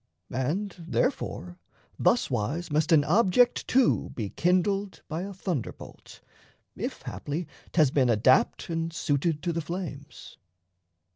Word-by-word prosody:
And 165 - -1
therefore, 180 -6 -2 0.4
thuswise 155 - +1
must 155 +3 +1
an 155 -3 +6
object 210 - +3
too 255 -1 +3
Be 105 -4 -3
kindled 190 +3 0
by 160 +1 -3
a 195 +2 -5
thunderbolt, 180 - -6 0.5
if - - -5
haply 155 +3 -4 0.2
'Thas 155 -6 +4
been 130 -3 +3
adapt 120 +3 +3
and 165 0 -2
suited 150 0 0
to 175 -2 0
the 165 - -1
flames. 155 -3 -7
165 Hz, 120 wpm, -27 LUFS, 145-185 Hz, 0.5 s, an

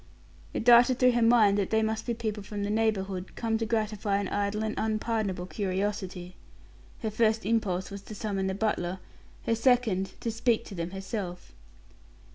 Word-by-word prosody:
It - - -3
darted 245 +1 +7
through 250 -1 +5
her 240 0 +1
mind 225 -3 +5
that 195 - 0
they 220 0 +2
must 220 +1 -2
be 235 - 0
people 215 -2 -3
from 205 +1 -5
the 205 - -1
neighborhood, 195 -4 -1
come 225 -1 -1
to 225 - -1
gratify 215 -2 0
an 200 -1 -2
idle 205 +1 -1
and 215 0 -1
unpardonable 215 -4 -1
curiosity. 190 -2 -3 0.7
Her 220 - -1
first 220 0 +2
impulse 200 -4 0
was 200 0 -6
to 215 - -8
summon 200 -2 -2
the 190 - -1
butler; 190 -4 -1 0.5
her - - +2
second, 230 -5 +1
to 230 - -1
speak 230 0 +1
to - - -9
them 170 -2 -3
herself. 190 -1 -6
215 Hz, 175 wpm, -28 LUFS, 195-225 Hz, 0.7 s, darted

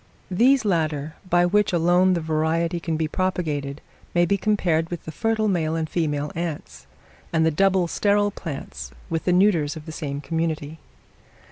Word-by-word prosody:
These 245 +6 +4
latter, 155 -5 0 0.2
by 175 0 +4
which 210 +3 +2
alone 175 +2 +3
the 170 - -1
variety 160 +2 0
can 165 -1 -2
be 160 0 0
propagated, 155 -6 -2 0.3
may 175 0 +4
be 200 - +2
compared 180 -6 +1
with 175 - -6
the 160 - -5
fertile 220 +6 0
male 165 -5 0
and 160 -1 -1
female 150 -3 -1
ants, 145 - -5 0.4
and 160 -1 +2
the 160 - +3
double 190 +2 +2
sterile 205 +3 +2
plants 135 - -7 0.2
with 165 -1 -2
the 180 - +3
neuters 175 -5 +3
of 155 -1 -9
the 160 - -7
same 145 -3 -4
community. 160 +1 -3
165 Hz, 165 wpm, -23 LUFS, 155-185 Hz, 0.4 s, These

